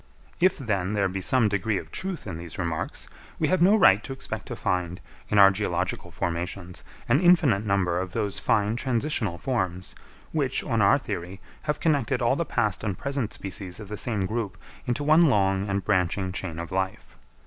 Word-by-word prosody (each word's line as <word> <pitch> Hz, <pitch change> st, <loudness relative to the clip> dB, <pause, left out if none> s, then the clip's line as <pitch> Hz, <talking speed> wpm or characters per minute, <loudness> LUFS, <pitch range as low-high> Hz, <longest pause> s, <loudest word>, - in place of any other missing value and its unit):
If 185 Hz, +1 st, +3 dB
then 100 Hz, -7 st, -1 dB
there 100 Hz, -2 st, +2 dB
be 95 Hz, +1 st, -4 dB
some 120 Hz, +3 st, +3 dB
degree 100 Hz, +1 st, 0 dB
of -, -, -7 dB
truth 190 Hz, -2 st, -3 dB
in 90 Hz, -5 st, -5 dB
these 85 Hz, -1 st, -8 dB
remarks, 85 Hz, -3 st, -3 dB, 0.3 s
we -, -, +1 dB
have 185 Hz, -2 st, +2 dB
no 195 Hz, +5 st, +6 dB
right 110 Hz, -, +5 dB
to -, -, -7 dB
expect 135 Hz, -, -6 dB
to -, -, -5 dB
find, 90 Hz, -1 st, -2 dB, 0.3 s
in 105 Hz, -, +1 dB
our 100 Hz, -1 st, +9 dB
geological 95 Hz, -2 st, -2 dB
formations, 85 Hz, +1 st, -4 dB, 0.2 s
an -, -, +4 dB
infinite 160 Hz, -, +4 dB
number 90 Hz, -3 st, +1 dB
of 95 Hz, 0 st, -4 dB
those 105 Hz, -3 st, -1 dB
fine 105 Hz, +1 st, +1 dB
transitional 120 Hz, -, 0 dB
forms, 95 Hz, -8 st, -2 dB, 0.4 s
which, -, -, 0 dB
on -, -, 0 dB
our -, -, +5 dB
theory, 90 Hz, +3 st, -6 dB, 0.3 s
have 150 Hz, -, 0 dB
connected 140 Hz, -5 st, +1 dB
all 120 Hz, +1 st, +2 dB
the 170 Hz, -, -1 dB
past 105 Hz, -8 st, -1 dB
and 100 Hz, -4 st, -2 dB
present 140 Hz, -5 st, -2 dB
species 95 Hz, -1 st, -5 dB
of 105 Hz, -3 st, -9 dB
the 105 Hz, -, -4 dB
same 105 Hz, -3 st, -1 dB
group 105 Hz, -3 st, -3 dB, 0.3 s
into 125 Hz, +4 st, -1 dB
one 155 Hz, +3 st, +5 dB
long 100 Hz, -, +3 dB
and 100 Hz, 0 st, -1 dB
branching 95 Hz, -1 st, +1 dB
chain 90 Hz, -3 st, -5 dB
of 85 Hz, +2 st, -6 dB
life. 95 Hz, 0 st, -3 dB
100 Hz, 190 wpm, -26 LUFS, 95-125 Hz, 0.4 s, our